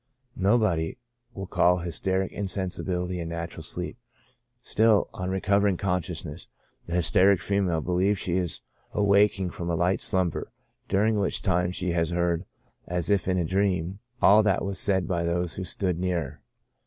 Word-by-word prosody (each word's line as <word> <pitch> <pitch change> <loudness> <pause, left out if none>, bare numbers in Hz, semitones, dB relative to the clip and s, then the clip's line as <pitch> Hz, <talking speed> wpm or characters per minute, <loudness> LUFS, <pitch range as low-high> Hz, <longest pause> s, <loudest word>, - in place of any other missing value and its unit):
Nobody 95 -4 +1 0.3
will 95 -4 -6
call 90 -1 +3
hysteric 95 +2 -1
insensibility 90 -2 -2
a 85 - -4
natural 85 0 -5
sleep; 90 +7 -4 0.6
still, 110 -3 +2
on 90 0 -4
recovering 100 0 +1
consciousness, 90 -4 -3 0.4
the 85 - -3
hysteric 90 +2 +4
female 90 -2 0
believes 90 +5 +1
she 90 -1 -1
is 90 -3 -2 0.3
awaking 100 -2 +3
from 85 0 -5
a 85 - 0
light 90 +3 +1
slumber, 90 -3 0 0.4
during 105 +2 +2
which 100 - -1
time 90 -2 +1
she 90 0 -2
has 85 -1 0
heard, 85 0 0 0.4
as 90 +1 0
if 100 -3 +1
in 95 -1 +1
a 85 - 0
dream, 95 0 0 0.2
all 105 +3 +7
that 100 -2 +1
was 100 -1 -1
said 95 -4 +3
by 85 -2 -1
those 85 0 0
who 95 - -5
stood 90 -2 -1
near 90 -1 0
her. 75 -2 -8
90 Hz, 155 wpm, -26 LUFS, 85-100 Hz, 0.6 s, all